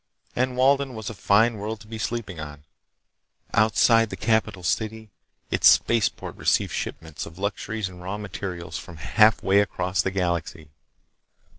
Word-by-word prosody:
And 125 0 0
Walden 135 0 +3
was 110 -1 -5
a - - -7
fine 110 +3 +3
world 105 +2 -5
to 105 - -14
be 110 0 -7
sleeping 110 -7 -4
on. 75 -1 -8 0.9
Outside 115 +1 +4
the - - -5
capital 110 -4 0
city 110 +4 -2 0.4
its - - +6
spaceport 115 -3 +1
received - - +1
shipments 80 -2 -5
of 80 - -13
luxuries 100 +1 -3
and 90 -1 -11
raw 95 +3 -4
materials 90 -5 -6
from 85 -2 -11
halfway 100 +3 +4
across 90 -2 0
the 95 - -1
galaxy. 85 -4 -3
105 Hz, 145 wpm, -24 LUFS, 90-110 Hz, 0.9 s, its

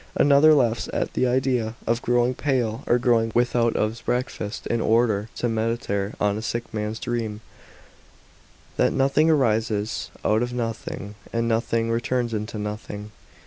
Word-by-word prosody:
f - - +2
Another 145 +2 +6
laughs 120 -5 +1
at - - -2
the 130 - +1
i 125 +1 +2
lea 125 -4 0
of 115 +1 0
growing 120 +1 +2
pale 125 -5 -1
or 120 - +4
going 115 -2 +2
without 120 -1 +2
ont 110 +1 0
's - - -12
breakfast 120 -4 -3
in 115 -1 0
order 110 -2 +2
to 120 - -1
meditare 110 -3 -1
on 105 0 +1
a - - -5
sick 120 +1 -4
man's 105 0 -3
dream, 115 -3 -3 1.4
"that - - +3
nothing 140 +4 +3
arises 110 -6 +1 0.2
out 110 +1 +3
of 120 0 -2
nothing, 115 -3 -4 0.2
and 115 0 0
nothing 115 0 0
returns 120 0 -1
into 110 +1 -3
nothing." 105 0 -6
115 Hz, 160 wpm, -24 LUFS, 110-120 Hz, 1.4 s, Another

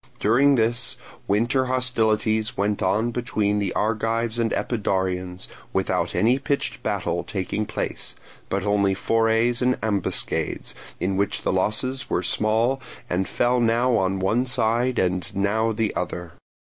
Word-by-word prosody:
During 135 +7 +4
this 115 0 0 0.3
winter 120 +6 +2
hostilities 110 -4 +1
went 100 +1 0
on 110 +4 +1
between 105 -4 0
the 100 -3 -1
Argives 115 +1 0
and 115 -1 +1
Epidaurians, 95 -5 -1 0.3
without - - 0
any 115 +8 +3
pitched 140 +1 -2
battle - - -1
taking 105 +1 -3
place, - - -4 0.3
but 95 0 -1
only 100 -1 +2
forays 115 +3 +2
and 125 0 +2
ambuscades, 100 -4 -1 0.3
in 95 +1 -1
which 100 +1 -1
the - - 0
losses 130 +5 0
were - - 0
small 115 +5 +1 0.3
and 90 +1 0
fell 125 +1 +2
now 120 +1 +2
on 95 -2 +1
one 110 +7 +1
side 120 0 +1
and 90 +2 0
now 105 +3 +1
on 110 - -2
the 110 -1 -1
other. 90 -1 -4
110 Hz, 140 wpm, -24 LUFS, 100-120 Hz, 0.3 s, During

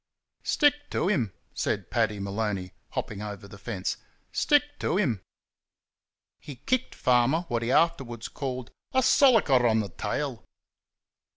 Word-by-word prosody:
"Stick 290 -1 +2
to 180 - 0
him!" 120 - +1 0.2
said - - -2
Paddy 110 -3 +1
Maloney, 100 -2 -2 0.2
hopping 105 -2 -4
over 105 -2 -6
the 100 -1 -12
fence, 100 -5 -3 0.3
"Stick 290 -1 +4 0.2
to 180 - 0
him!" 125 - +1 1.2
He 145 - -9
kicked 240 - -1
Farmer 125 +5 +3
what 120 -1 0
he 115 +2 -1
afterwards 130 -9 +1
called 130 -3 -5 0.2
"a 260 0 +3
sollicker 210 - +5
on 110 -1 +3
the 105 -2 -2
tail." 85 - -3
120 Hz, 130 wpm, -27 LUFS, 105-170 Hz, 1.2 s, sollicker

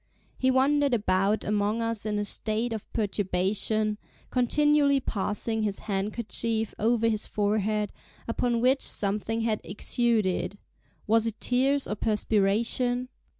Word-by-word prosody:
He 260 - +1
wandered 275 +1 +3
about 200 0 +1
among 210 +2 0
us 230 -2 -2
in 210 -1 -1
a 205 - 0
state 220 +3 -2
of 220 - -7
perturbation, 210 +1 0 0.3
continually 285 +2 +3
passing 220 -1 -1
his 205 -2 -1
handkerchief 220 +2 -1
over 230 +1 +2
his 215 -2 -1
forehead, 210 0 0 0.3
upon 235 0 0
which 260 +3 +3
something 210 +3 -1
had 225 -2 0
exuded—was 220 0 -1
it 225 -1 -5
tears 270 +3 +2
or - - -2
perspiration? 225 +4 0
220 Hz, 115 wpm, -27 LUFS, 210-240 Hz, 0.3 s, wandered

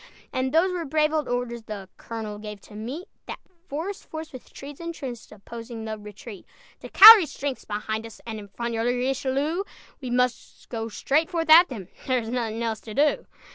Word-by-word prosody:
And 260 0 -1
those 335 +5 +3
were 350 -2 -2
brave 305 +1 +1
old 305 -3 0
orders 245 -1 -2
The 210 -3 -8
colonel 215 -2 -6
gave 210 -1 -8
to - - -16
meet 250 - -6 0.2
That - - -5 0.3
forest 335 +8 -5
force 315 -1 -7
with 255 - -11
trees 280 0 -10
entrenched 285 -9 -7
Opposing 225 +2 -9
the 220 0 -4
retreat: 210 0 -11 0.3
"De - - -10
Callière's 415 -7 +10
strength's 280 -2 -4
behind 220 +1 -4
us, 225 - -14
And 220 -2 -5
in 205 - -10
front 235 +4 -5
your 225 0 -1
Richelieu; 270 +7 0 0.4
We 255 - -5
must 250 0 -2
go 225 -1 -4
straightforth 320 - 0
at 340 +3 +9
them; 210 -9 -7 0.2
There 255 -1 +2
is 225 -2 -3
nothing 235 -2 -2
else 225 -2 -2
to 215 -2 -9
do." 295 +1 +2
245 Hz, 185 wpm, -25 LUFS, 225-305 Hz, 0.4 s, Callière's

